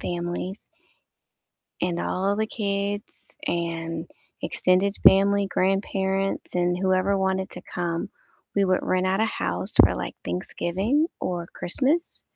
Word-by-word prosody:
families. 175 +3 -3 1.2
And 175 -1 0
all 195 +3 0
the 220 +1 +1
kids 205 -1 -3
and 165 -2 -2 0.4
extended 185 +2 +2
family, 200 +1 +6
grandparents, 195 0 0
and 175 0 +2
whoever 190 +1 +2
wanted 190 0 0
to - - -9
come, 170 -2 -2 0.4
we 200 - +3
would 185 -1 +2
rent 185 0 +1
out 190 +2 +1
a - - +4
house 225 - -2
for, - - +4
like, - - -4
Thanksgiving 195 - 0
or 175 -2 -2
Christmas, 285 - -1
190 Hz, 120 wpm, -25 LUFS, 175-200 Hz, 1.2 s, family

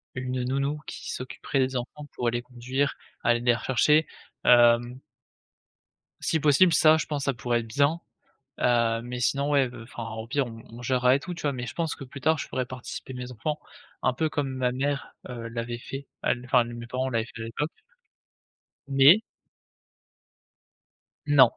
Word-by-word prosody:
une 125 0 -2
nounou 140 +4 -1
qui - - -6
s'occuperait 130 +2 -3
des 130 0 +1
enfants 145 +4 -6
pour 120 - -2
aller 120 +1 +1
les - - -7
conduire, 125 +3 -2 0.3
aller 120 0 +3
les 120 0 +4
rechercher, 140 +6 +3 0.4
hem 120 +1 +5 1.2
si 160 - +1
possible, 155 +5 +5
ça 155 0 +6
je - - -2
pense 145 -3 -2
ça 135 - +1
pourrait 120 +1 0
être 115 - -7
bien, 140 +8 +2 0.6
heu, 115 -2 +3
mais 125 0 -5
sinon, 140 +3 +1
ouais, 135 -4 +3
enfin 115 0 -8
au 110 0 -5
pire 140 +2 0
on 115 -1 -9
on 120 +1 -10
gérera 125 0 +3
et 140 - +1
tout 180 +2 -6
tu 170 - -9
vois? 145 -2 +1
Mais 125 -1 -5
je - - -7
pense 165 -2 -1
que 140 - -9
plus 135 +1 -10
tard 160 +2 +3
je - - -5
pourrais 130 -1 -2
participer 130 +1 -7
mes 125 0 -6
enfants, 145 +6 -3 0.4
un - - +3
peu 155 +5 0
comme 145 -2 -1
ma 125 -1 0
mère, 140 +2 -2
heu, 115 -2 -6
l'avait 115 +1 -4
fait, 135 +3 -7 0.2
elle 120 0 0
enfin 125 -1 +4
mes 120 0 -7
parents 130 +2 -2
l'avaient 115 -2 0
fait 115 - -6
à - - -4
l'époque 130 +7 -2 1.2
mais 140 +9 +7 2.1
Non, 135 -5 +7
130 Hz, 185 wpm, -27 LUFS, 120-140 Hz, 2.1 s, mais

